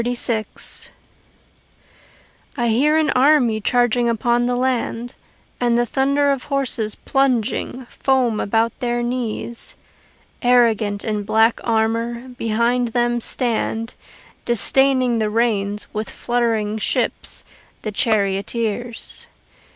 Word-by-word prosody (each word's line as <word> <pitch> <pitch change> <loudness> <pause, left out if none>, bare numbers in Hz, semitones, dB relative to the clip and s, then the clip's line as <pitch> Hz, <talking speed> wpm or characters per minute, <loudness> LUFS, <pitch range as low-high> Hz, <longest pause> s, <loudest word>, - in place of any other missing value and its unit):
XXXVI 235 -2 -4 1.7
I 240 -2 +1
hear 290 +8 +3
an 310 -2 +2
army 255 -5 +3
charging 245 +1 +2
upon 240 +1 +1
the 245 - 0
land, 245 -1 -1 0.5
And 240 -1 +2
the 240 - +2
thunder 280 +3 +1
of 275 -2 -2
horses 260 -6 -1
plunging, 255 -1 -1
foam 255 -5 +1
about 225 +2 0
their 240 -1 -1
knees: 240 -1 -4 0.7
Arrogant, 225 -5 +3
in 215 -2 -1
black 220 +2 +2
armour, 230 +2 -1
behind 240 +1 0
them 240 +1 0
stand, 230 -1 -1 0.5
Disdaining 255 +1 +3
the 215 -1 0
reins, 210 -2 0
with 215 +1 -3
fluttering 225 -3 -1 0.2
whips, - - -2 0.4
the 215 - -3
charioteers. 215 +3 -1
235 Hz, 105 wpm, -20 LUFS, 220-250 Hz, 1.7 s, hear